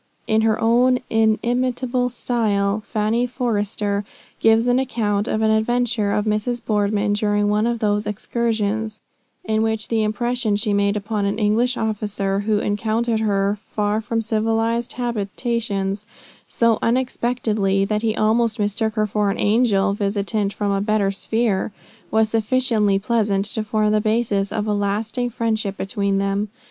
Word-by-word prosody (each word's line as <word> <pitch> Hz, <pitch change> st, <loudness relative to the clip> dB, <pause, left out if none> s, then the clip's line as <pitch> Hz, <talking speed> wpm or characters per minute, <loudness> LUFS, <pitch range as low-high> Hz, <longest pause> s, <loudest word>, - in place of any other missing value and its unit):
In 220 Hz, 0 st, +2 dB
her 220 Hz, -1 st, +2 dB
own 245 Hz, +2 st, +4 dB
inimitable 245 Hz, +3 st, +1 dB
style 215 Hz, -4 st, 0 dB
"Fanny 220 Hz, +3 st, 0 dB
Forrester" 210 Hz, -4 st, -1 dB, 0.4 s
gives 225 Hz, +1 st, +4 dB
an 245 Hz, +1 st, +3 dB
account 215 Hz, -5 st, -1 dB
of 220 Hz, -, 0 dB
an 220 Hz, -, +3 dB
adventure 220 Hz, -1 st, +1 dB
of 210 Hz, +1 st, 0 dB
Mrs. 215 Hz, +3 st, 0 dB
Boardman 205 Hz, -1 st, +1 dB
during 205 Hz, 0 st, +1 dB
one 210 Hz, +2 st, +2 dB
of 235 Hz, 0 st, 0 dB
these 210 Hz, -1 st, 0 dB
excursions; 220 Hz, 0 st, -2 dB, 0.5 s
in 220 Hz, 0 st, +1 dB
which 220 Hz, -1 st, -1 dB
the 225 Hz, -1 st, +1 dB
impression 225 Hz, +1 st, 0 dB
she 210 Hz, 0 st, 0 dB
made 200 Hz, +1 st, +1 dB
upon 210 Hz, 0 st, -2 dB
an 200 Hz, +1 st, -1 dB
English 230 Hz, +4 st, +1 dB
officer 205 Hz, -3 st, -1 dB
who 210 Hz, +1 st, +1 dB
encountered 220 Hz, +2 st, 0 dB
her 200 Hz, -1 st, 0 dB, 0.2 s
far 210 Hz, +1 st, +1 dB
from 225 Hz, +1 st, -1 dB
civilized 225 Hz, +1 st, 0 dB
habitations, 210 Hz, -3 st, -2 dB, 0.4 s
so 230 Hz, -2 st, +2 dB
unexpectedly 230 Hz, -5 st, 0 dB
that 210 Hz, +1 st, -1 dB
he 225 Hz, -1 st, 0 dB
almost 225 Hz, +1 st, +2 dB
mistook 215 Hz, +1 st, 0 dB
her 215 Hz, -1 st, +2 dB
for 210 Hz, 0 st, 0 dB
an 195 Hz, -, -1 dB
angel 205 Hz, -2 st, +2 dB
visitant 200 Hz, 0 st, -1 dB
from 205 Hz, -1 st, -2 dB
a 195 Hz, 0 st, 0 dB
better 210 Hz, -1 st, +1 dB
sphere, 215 Hz, 0 st, -1 dB, 0.4 s
was 220 Hz, 0 st, +3 dB
sufficiently 225 Hz, -2 st, +2 dB
pleasant 205 Hz, -2 st, 0 dB
to 215 Hz, +1 st, -1 dB
form 215 Hz, 0 st, +1 dB
the 215 Hz, 0 st, +2 dB
basis 215 Hz, -2 st, 0 dB
of 215 Hz, -1 st, -2 dB
a 210 Hz, -, 0 dB
lasting 210 Hz, +4 st, -1 dB
friendship 220 Hz, -4 st, -2 dB
between 200 Hz, 0 st, -1 dB
them. 200 Hz, +1 st, -1 dB
215 Hz, 150 wpm, -21 LUFS, 205-230 Hz, 0.5 s, own